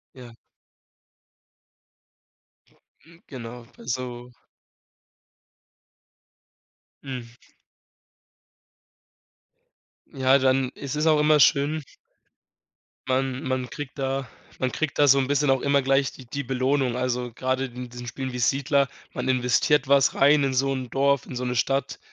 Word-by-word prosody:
Ja. 120 Hz, -2 st, -12 dB, 2.7 s
Mm. 165 Hz, +1 st, -19 dB
Genau, 120 Hz, -2 st, -9 dB, 0.2 s
so 125 Hz, 0 st, -5 dB, 2.7 s
Hm. 130 Hz, -4 st, -6 dB, 2.8 s
Ja, 135 Hz, 0 st, +3 dB
dann 130 Hz, -1 st, +2 dB
ist 140 Hz, 0 st, -5 dB
es 150 Hz, +2 st, 0 dB
auch 155 Hz, -1 st, +4 dB
immer 150 Hz, 0 st, +4 dB
schön 145 Hz, +2 st, +3 dB, 1.2 s
man 130 Hz, 0 st, -1 dB
man 130 Hz, -1 st, -2 dB
kriegt 145 Hz, -1 st, -8 dB
da 135 Hz, -1 st, -2 dB, 0.3 s
man 130 Hz, -1 st, 0 dB
kriegt 155 Hz, -2 st, -3 dB
da 145 Hz, -, +6 dB
so 140 Hz, -, +6 dB
'n 130 Hz, -1 st, +1 dB
bisschen 145 Hz, 0 st, +1 dB
auch 135 Hz, -1 st, +3 dB
immer 140 Hz, 0 st, +2 dB
gleich 135 Hz, 0 st, +2 dB
die 130 Hz, -, -13 dB
die 140 Hz, +4 st, -5 dB
Belohnung. 130 Hz, 0 st, 0 dB
Also, 125 Hz, -1 st, -2 dB
grade 130 Hz, +2 st, -1 dB
in 125 Hz, -1 st, -8 dB
diesen 120 Hz, 0 st, -9 dB
Spielen 130 Hz, +2 st, -5 dB
wie 125 Hz, -, -5 dB
Siedler, 140 Hz, +3 st, +2 dB, 0.3 s
man 125 Hz, -, -4 dB
investiert 130 Hz, +3 st, +2 dB
was 140 Hz, -1 st, +4 dB
rein 145 Hz, +1 st, +4 dB
in 135 Hz, -1 st, 0 dB
so 135 Hz, +1 st, +1 dB
'n 130 Hz, -2 st, -5 dB
Dorf, 140 Hz, +1 st, +1 dB
in 130 Hz, -, -8 dB
so 125 Hz, -, -3 dB
'ne 125 Hz, 0 st, -2 dB
Stadt 135 Hz, +3 st, -1 dB
130 Hz, 125 wpm, -25 LUFS, 125-140 Hz, 2.8 s, da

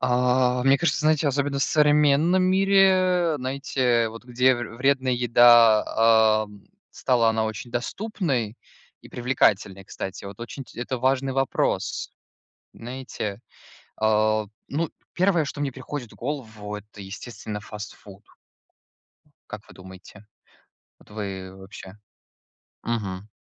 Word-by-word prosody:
А, 125 Hz, 0 st, +2 dB
мне 135 Hz, +1 st, +5 dB
кажется, 170 Hz, -1 st, 0 dB
знаете, 155 Hz, 0 st, +2 dB
особенно 140 Hz, 0 st, -1 dB
в -, -, +1 dB
современном 150 Hz, +4 st, +3 dB
мире, 185 Hz, -3 st, +3 dB
знаете, 130 Hz, -3 st, 0 dB
вот 115 Hz, +2 st, -11 dB
где 125 Hz, +1 st, +3 dB
вр 120 Hz, -2 st, -6 dB
вредная 130 Hz, 0 st, +1 dB
еда, 115 Hz, -2 st, +5 dB
ам, 105 Hz, -1 st, -16 dB, 0.3 s
стала 120 Hz, -3 st, +2 dB
она 110 Hz, 0 st, 0 dB
очень 110 Hz, +2 st, -5 dB
доступной 125 Hz, -, -3 dB, 0.4 s
и -, -, -15 dB
привлекательной, 100 Hz, -6 st, 0 dB
кстати. 95 Hz, +1 st, -7 dB
Вот 100 Hz, +2 st, -10 dB
очень 130 Hz, +3 st, -7 dB
ть -, -, -18 dB
это 125 Hz, +1 st, -3 dB
важный 135 Hz, +1 st, +1 dB
вопрос. 135 Hz, -1 st, -1 dB, 0.6 s
Знаете, 120 Hz, -4 st, -6 dB, 0.6 s
а, 110 Hz, 0 st, +2 dB, 0.2 s
ну 160 Hz, +3 st, -2 dB, 0.2 s
1, 175 Hz, -3 st, +2 dB
что 145 Hz, +1 st, -6 dB
мне 140 Hz, -2 st, -1 dB
приходит 130 Hz, -1 st, -7 dB
в -, -, -16 dB
голову, 110 Hz, -6 st, -6 dB
это, 105 Hz, 0 st, -11 dB
естественно, 105 Hz, +2 st, -7 dB
фастфуд. 105 Hz, -1 st, -11 dB, 1.2 s
Как 105 Hz, -, -8 dB
вы -, -, -15 dB
думаете? 95 Hz, +3 st, -14 dB, 0.7 s
Вот -, -, -22 dB
вы 95 Hz, -3 st, -6 dB
вообще? 95 Hz, +1 st, -12 dB, 0.9 s
Мгм. 105 Hz, -4 st, -4 dB
120 Hz, 120 wpm, -24 LUFS, 110-140 Hz, 1.2 s, мне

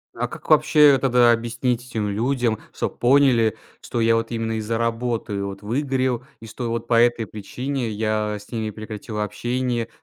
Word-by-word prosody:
а -, -, -1 dB
как -, -, -11 dB
вообще 150 Hz, -2 st, +6 dB
тогда 125 Hz, -2 st, +5 dB
объяснить 120 Hz, +1 st, -1 dB
этим 110 Hz, -3 st, -2 dB
людям, 115 Hz, +2 st, 0 dB
чтоб -, -, -4 dB
поняли, 120 Hz, -4 st, +4 dB, 0.2 s
что 120 Hz, -, -4 dB
я 115 Hz, 0 st, +4 dB
вот 115 Hz, 0 st, -1 dB
именно 115 Hz, -1 st, -2 dB
из-за 110 Hz, +1 st, -2 dB
работы 115 Hz, -3 st, -2 dB
вот 100 Hz, 0 st, -6 dB
выгорел 130 Hz, +1 st, -1 dB, 0.2 s
и 115 Hz, -, -11 dB
что 115 Hz, +2 st, -5 dB
вот 115 Hz, 0 st, -3 dB
по 115 Hz, -1 st, +4 dB
этой 120 Hz, -1 st, +2 dB
причине 125 Hz, +5 st, -4 dB
я 110 Hz, 0 st, -1 dB
с 105 Hz, -, -17 dB
ними 110 Hz, -2 st, -2 dB
прекратил 110 Hz, 0 st, -7 dB
общение? 120 Hz, +3 st, -2 dB
115 Hz, 170 wpm, -22 LUFS, 110-125 Hz, 0.2 s, вообще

